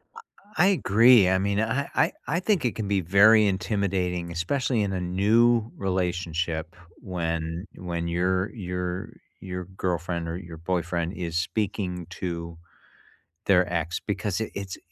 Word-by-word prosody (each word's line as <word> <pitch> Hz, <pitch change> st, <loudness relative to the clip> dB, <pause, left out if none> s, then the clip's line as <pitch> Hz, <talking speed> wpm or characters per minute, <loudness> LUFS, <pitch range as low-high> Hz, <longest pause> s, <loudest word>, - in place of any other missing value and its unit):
I 455 Hz, -, -10 dB, 0.4 s
I 175 Hz, +4 st, +5 dB
agree. 120 Hz, -, +6 dB
I 95 Hz, -, +3 dB
mean, 100 Hz, +1 st, 0 dB
I 115 Hz, +6 st, 0 dB
I -, -, +3 dB, 0.2 s
I 165 Hz, +4 st, +1 dB
think 190 Hz, -5 st, +1 dB
it 120 Hz, -, 0 dB
can 110 Hz, -3 st, -3 dB
be 100 Hz, -1 st, +1 dB
very 105 Hz, +5 st, +6 dB
intimidating, 95 Hz, -4 st, -1 dB
especially 115 Hz, +8 st, 0 dB
in 100 Hz, -2 st, -1 dB
a 90 Hz, -, -2 dB
new 110 Hz, +6 st, +3 dB
relationship, 85 Hz, -3 st, -2 dB, 0.3 s
when 85 Hz, 0 st, -3 dB
when 85 Hz, -1 st, -4 dB
your 90 Hz, +3 st, 0 dB
your 90 Hz, -2 st, -4 dB, 0.3 s
your 90 Hz, -1 st, -5 dB
girlfriend, 85 Hz, -1 st, -2 dB
or 85 Hz, -, -3 dB
your 85 Hz, -2 st, -9 dB
boyfriend, 85 Hz, 0 st, -2 dB
is 85 Hz, 0 st, -5 dB
speaking 90 Hz, -1 st, -2 dB
to 85 Hz, -2 st, -5 dB, 0.9 s
their 90 Hz, -2 st, +3 dB
ex, 85 Hz, -1 st, -1 dB
because 105 Hz, -1 st, -2 dB
it 110 Hz, -, -3 dB
it's 100 Hz, -2 st, -5 dB
90 Hz, 145 wpm, -26 LUFS, 85-105 Hz, 0.9 s, agree